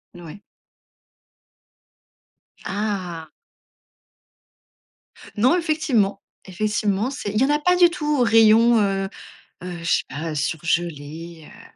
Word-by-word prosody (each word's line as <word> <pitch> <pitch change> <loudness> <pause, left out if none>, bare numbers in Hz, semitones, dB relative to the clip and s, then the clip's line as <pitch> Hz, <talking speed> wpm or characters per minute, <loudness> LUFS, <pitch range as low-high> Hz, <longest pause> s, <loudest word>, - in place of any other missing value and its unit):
N 175 - -11
ouais. 165 +6 -10 2.2
Ah! 190 -5 -4 2.1
Non, 255 +10 +4
effectivement, 265 - 0 0.2
effectivement, 210 +3 -1
c'est 265 -7 -5
il 215 - 0
y - - +5
en - - -1
a 295 0 +2
pas 360 +4 +2
du 355 -1 +6
tout 300 -4 -2
au - - +5
rayon, 225 0 +5
heu, 195 -1 -1 0.5
heu, 180 -1 -6
je - - -9
sais 170 - +1
pas, 155 +3 -5
surgelé, 160 +1 -3
heu, - - -15
205 Hz, 115 wpm, -22 LUFS, 170-240 Hz, 2.2 s, du